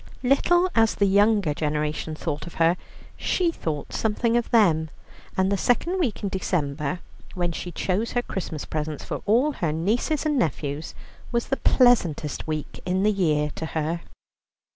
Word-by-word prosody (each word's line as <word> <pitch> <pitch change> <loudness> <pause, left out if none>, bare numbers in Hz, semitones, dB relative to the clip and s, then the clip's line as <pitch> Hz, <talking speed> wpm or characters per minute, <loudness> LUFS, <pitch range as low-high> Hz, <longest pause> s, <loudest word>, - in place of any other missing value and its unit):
Little 345 +8 +4
as 225 -1 +3
the 200 - +3
younger 200 -4 +3
generation 150 +1 -2
thought 150 -1 -4
of 170 - -10
her, 165 +1 +4 0.4
she 350 -2 +1
thought 155 - -4
something 230 +2 +1
of 240 -1 +1
them, 165 -9 +4 0.5
and 190 +1 +2
the 200 - +2
second 340 - +1
week 250 - -1
in 200 - 0
December, 160 -3 -2 0.3
when 175 -1 0
she 175 +2 -5
chose 195 +7 -1
her 245 - +1
Christmas 165 -9 -5
presents 155 -1 -4
for - - -4
all 245 +8 +4
her 170 - -1
nieces 225 - 0
and 300 -3 +2
nephews, 150 - -2 0.4
was 235 -1 -1
the 270 - +1
pleasantest 175 - +2
week 155 -1 -4
in 185 +1 0
the 215 - +4
year 155 -7 +1
to 160 - -5
her. 160 +2 -1
185 Hz, 165 wpm, -25 LUFS, 155-230 Hz, 0.5 s, Little